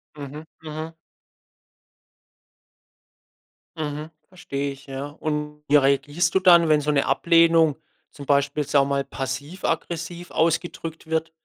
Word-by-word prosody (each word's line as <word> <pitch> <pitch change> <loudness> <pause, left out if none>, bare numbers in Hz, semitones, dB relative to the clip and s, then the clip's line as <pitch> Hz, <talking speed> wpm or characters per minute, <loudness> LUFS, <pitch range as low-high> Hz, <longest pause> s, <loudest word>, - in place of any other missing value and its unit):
Mhm, 145 +1 -8 0.2
mhm. 155 +1 -6 2.8
Mhm. 150 0 -4 0.2
Verstehe 140 -6 -4
ich, 135 0 -12
ja. 135 +1 -5
Und 150 0 -4
wie 145 - +3
reagierst 145 +4 +2
du - - +6
dann, 170 -3 +6
wenn 150 -1 +4
so 150 +1 0
'ne 140 -2 +2
Ablehnung 165 -2 +4 0.4
zum 145 - -10
Beispiel, 140 +1 +1
sagen 140 0 +3
wir - - -5
mal 140 - 0
passiv-aggressiv 165 +5 -4
ausgedrückt 165 0 -1
wird? 160 0 -1
150 Hz, 120 wpm, -24 LUFS, 140-165 Hz, 2.8 s, du